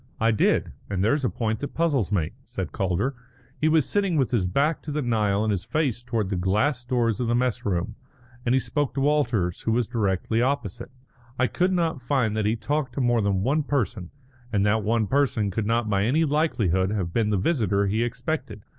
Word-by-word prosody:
"I 115 +1 +3
did, 110 - +2 0.2
and 95 -2 -1
there's 140 +7 +2
a 125 - +2
point 110 -1 -2
that 145 - -6
puzzles 145 - +1
me," 85 -7 0
said - - -5
Calder. 95 +8 -1 0.4
He 155 - 0
was 155 -3 +3
sitting 195 -5 +1
with 130 -3 +1
his 105 -7 +1
back 145 - +1
to 150 - -6
the 150 0 -1
Nile 105 -4 +1
and 110 - +1
his 95 -3 -1
face 145 -7 -1
towards 115 -5 -2
the - - 0
glass 105 +8 +1
doors 120 -3 0
of 125 - -1
the 120 - +2
mess 125 -3 0
room, 90 -3 -1 0.5
and 125 +1 +2
he - - +4
spoke 145 +1 -2
to 135 - 0
Walters, 120 - +1
who 115 - -1
was 120 -1 +1
directly 110 -1 0
opposite. 120 -4 -2 0.5
"I 130 - +3
could 180 +8 +1
not 165 -6 0
find 125 -4 0
that 110 -1 0
he 110 - +2
talked 130 +3 -2
to - - -2
more 120 -2 +2
than 100 -2 0
one 145 +7 +2
person, 115 - -2 0.4
and 100 -3 +2
that 110 +1 +2
one 110 +1 +1
person 130 -5 +1
could 105 +2 -2
not 115 0 +1
by 100 -1 +1
any 155 +8 +2
likelihood 110 - +1
have 95 -5 -2
been 110 -2 +1
the 105 - +1
visitor 100 - +1
he 110 +4 +1
expected. 125 -3 -4
115 Hz, 215 wpm, -25 LUFS, 105-140 Hz, 0.5 s, he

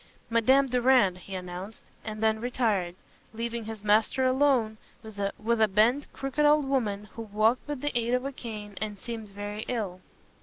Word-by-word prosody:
"Madame 260 +4 +4
Durand," 250 -6 +4
he 190 +2 -8
announced, 180 +3 -7 0.2
and 215 0 -5
then 220 0 +2
retired, 220 -8 0 0.4
leaving 235 0 -3
his 220 -2 -7
master 215 +5 +3
alone 255 -5 +2 0.2
with 220 -2 -10 0.4
a 220 - +6
bent, 235 +8 +3
crooked 275 +2 -2
old 295 0 +5
woman 215 -7 0
who 230 - -7
walked 220 +4 +1
with 290 -3 -4
the 290 -2 -2
aid 240 +1 +2
of 250 +1 -2
a 275 - -2
cane, 215 -5 -8
and 210 -1 -3
seemed 225 0 -6
very 205 +1 -6
ill. 200 -7 -3
225 Hz, 165 wpm, -28 LUFS, 210-255 Hz, 0.4 s, a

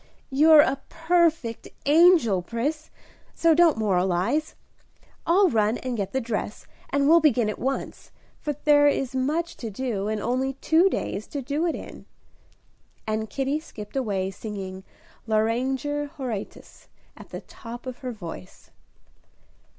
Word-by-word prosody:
"You're 305 +3 +7
a 275 -3 0
perfect 325 -8 +1 0.2
angel, 295 - +5
Pris; 280 - -3 0.5
so 330 -1 +4
don't 330 -3 +4
moralize. 190 - 0 0.7
I'll 380 +4 +5
run 220 -3 +1
and 255 -1 -4
get 200 -4 -3
the 265 - 0
dress, 225 -3 -4 0.2
and 280 0 +1
we'll 330 +2 +7
begin 250 -8 +3
at - - -9
once, 270 +2 -4 0.3
for 295 - -3
there 290 -1 +5
is 270 -2 0
much 305 +6 -1
to 230 - -5
do, 210 -2 -3
and 215 0 -1
only 255 +5 -1
two 325 +7 +3
days 215 - -3
to 285 -2 -5
do 295 +6 -1
it 330 - -1
in." - - -10 1.0
And 220 0 -2
Kitty 275 +5 -1
skipped 210 -8 -11
away, 200 -7 -1
singing 190 -2 -7 0.4
"Lauriger 260 +7 0
Horatius," 255 -8 -7 0.3
at - - -13
the - - -7
top 240 +1 -10
of 255 -1 -7
her 255 -3 -5
voice. 170 - -10
260 Hz, 140 wpm, -25 LUFS, 215-300 Hz, 1.0 s, You're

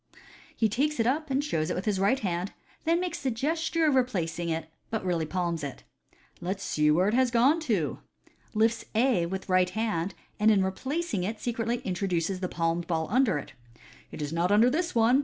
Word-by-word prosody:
He 225 - +3
takes 280 +7 0
it 225 - +3
up 300 +5 0
and 275 +1 +1
shows 160 - -1
it - - -1
with 195 +1 -1
right 200 +7 +3
hand, 180 -1 -2 0.3
then 335 +2 +3
makes 360 -1 -3
the 270 - 0
gesture 320 +7 0
of 300 - +4
replacing, 170 -10 0 0.2
but 220 -4 -3
really 170 -3 0
palms 170 -2 -2
it. 140 -2 -6 0.3
" - - -31
Let 185 +3 -1
us 200 - -10
see 150 0 +2
where 175 +5 +4
it - - -1
has 255 +1 +3
gone 250 +7 +4
to 175 -10 0 0.3
" - - -31
(lifts 225 +1 +2
A 225 -7 +3
with 190 +2 -5
right 185 -1 +3
hand, 205 -5 -2 0.2
and 215 +1 +5
in 200 -3 +4
replacing 260 - -2
it 215 +3 -3
secretly 235 0 -2
intro 190 +1 -2
duces 180 +1 0
the 185 -1 -2
palmed 165 0 -1
ball 160 -2 -1
under 245 - +3
it). 140 - -7 0.3
" - - -23
It 150 - -5
is 145 +2 -4
not 170 +3 +1
under 225 +4 +5
this 335 +1 -1
one. 235 +3 +5
205 Hz, 215 wpm, -28 LUFS, 175-250 Hz, 0.3 s, and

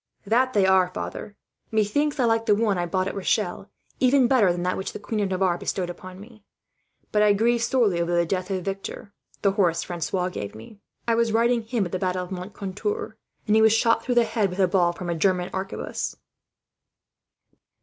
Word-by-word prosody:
"That 245 +3 +2
are 190 -1 +5
they, 180 - -17
father. 205 - -6 0.3
Methinks 275 +8 0
I 250 - +3
like 225 0 +1
the 210 - +5
one 210 -2 +1
I 175 -1 -1
bought 185 +2 0
at - - -3
Rochelle 195 -1 -1 0.3
even 260 0 +4
better 235 -8 +4
than 175 0 -3
that 180 0 0
which 190 - -5
the - - -6
Queen 220 - -3
of 200 -2 0
Navarre 185 -2 +1
bestowed 180 -2 -2
upon 185 +1 -11
me; 215 0 -14 0.7
but 210 - +2
I 210 -1 +5
grieved 230 +3 +2
sorely 230 -8 +2
over 170 0 -1
the 170 0 +3
death 185 +2 -2
of 185 -2 -3
Victor, 195 +1 -6 0.3
the 200 - +4
horse 180 -4 +1
Francois 180 +1 -2
gave 105 - -6
me. 155 - -12 0.3
I 230 - +3
was 230 0 +2
riding 235 +2 +2
him 220 -2 -1
at 175 - -6
the 185 - -2
fight 185 -1 -1
of 180 0 -4
Moncontour, 200 - -4 0.3
and 210 - +2
he 220 - +5
was 220 0 +6
shot 230 +1 +2
through 250 - -1
the 240 - +5
head 220 -3 0
with 180 - -7
a 190 -2 +4
ball 175 -2 +2
from 175 +1 -7
a 170 - 0
German 180 +1 0
arquebus." 190 0 -4
200 Hz, 210 wpm, -24 LUFS, 180-225 Hz, 0.7 s, was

